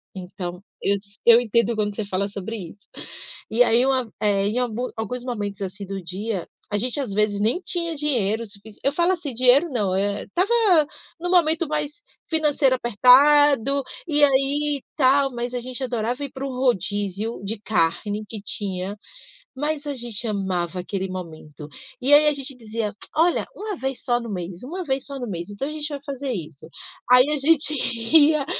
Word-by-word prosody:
então, 180 0 -7 0.2
eu 200 - +2 0.3
eu 235 0 +8
entendo 235 0 +1
quando 210 -1 -1
você 220 - -3
fala 200 0 -1
sobre 200 +2 -6 0.2
isso, 205 - -22 0.6
e 235 +3 +5
aí 235 +1 +4
uma 260 -2 +1
eh, 200 -2 +2
em 220 +4 0
algu 245 0 -2
alguns 240 +3 -4
momentos 205 -6 -4
assim 195 +1 -6
do 195 0 -5
dia, 190 +2 -4 0.2
a 205 - +1
gente 245 +6 0
às 260 -7 -3
vezes, 210 0 +1
nem 220 - +1
tinha 335 -2 0
dinheiro 230 -7 +1
sufici 205 0 -13
eu 275 - +1
falo, 345 +4 +2
assim, 320 -7 -4
dinheiro 255 +6 +5
não, 205 -7 0
eh, 200 +1 -1
estava 375 +6 0 0.7
no 355 +1 -3
momento 330 -2 +3
mais 300 +5 -4 0.3
financeiro 300 -5 +3
apertado 275 +3 +5 0.3
e 295 -2 +3
aí, 280 +1 +2
tal, 275 0 +4
mas 240 +1 -4
a - - 0
gente 255 +2 -4
adorava 245 +2 -2
ir 280 - -5
para 265 +1 -6
um - - -5
rodízio 210 -4 -1
de 205 +2 -3
carne 205 +2 0
que 220 - -6
tinha, 195 -1 -3 0.6
mas 295 +2 -2
a 285 - -1
gente 240 -2 -2
amava 185 -3 -2
aquele 190 +1 -4
momento 160 -5 -8 0.3
e 270 +3 +4
aí, 295 +1 +8
a 300 - +4
gente 275 -1 -4
dizia: 225 -2 -4 0.2
“Olha, 330 +2 +2
uma 420 -1 -5
vez 265 -2 -4
só 240 -1 +2
no 235 - -7
mês, 180 -1 -6
uma 355 +8 -5
vez 265 -2 -1
só 280 -1 -6
no 245 - -4
mês, 175 -2 -5
então, 205 +7 -4
a - - -5
gente 305 0 -3
vai 290 -1 -5
fazer 275 -1 -4
isso”. 160 - -8 0.4
Aí 250 0 +8
a - - +2
gente 305 +1 +3 0.4
ia, 300 -1 +4
240 Hz, 185 wpm, -23 LUFS, 205-280 Hz, 0.7 s, eu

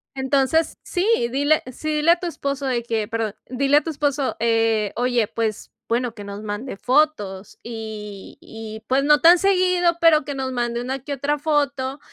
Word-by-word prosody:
entonces, 270 +4 +1
sí, 365 +3 -1 0.2
dile 290 +3 +2
sí, 310 +4 -3
dile 315 +3 +4
a 345 - +3
tu 355 - -4
esposo 280 -4 -3
de 245 -3 -1
que 225 -3 -2
perdón, 225 -2 -3
dile 275 +3 +2
a - - +4
tu 330 - -4
esposo: 285 -2 -1
“Eh, 225 -2 +1
oye, 245 -2 +1
pues, 225 -2 -3 0.2
bueno, 240 0 -1
que 205 - -9
nos 200 +1 -7
mande 210 +3 -5
fotos. 245 -9 0
Y 215 -3 -8
y, 220 0 -9
pues, 270 +2 +2
no 295 0 +5
tan 345 +2 +8
seguido, 365 -2 +2
pero 310 -4 +5
que 285 - -4
nos 260 -1 -3
mande 240 -1 -2
una 265 +2 -3
que 280 +3 -6
otra 285 +2 -1
foto 285 -2 -1
265 Hz, 185 wpm, -22 LUFS, 225-295 Hz, 0.2 s, tan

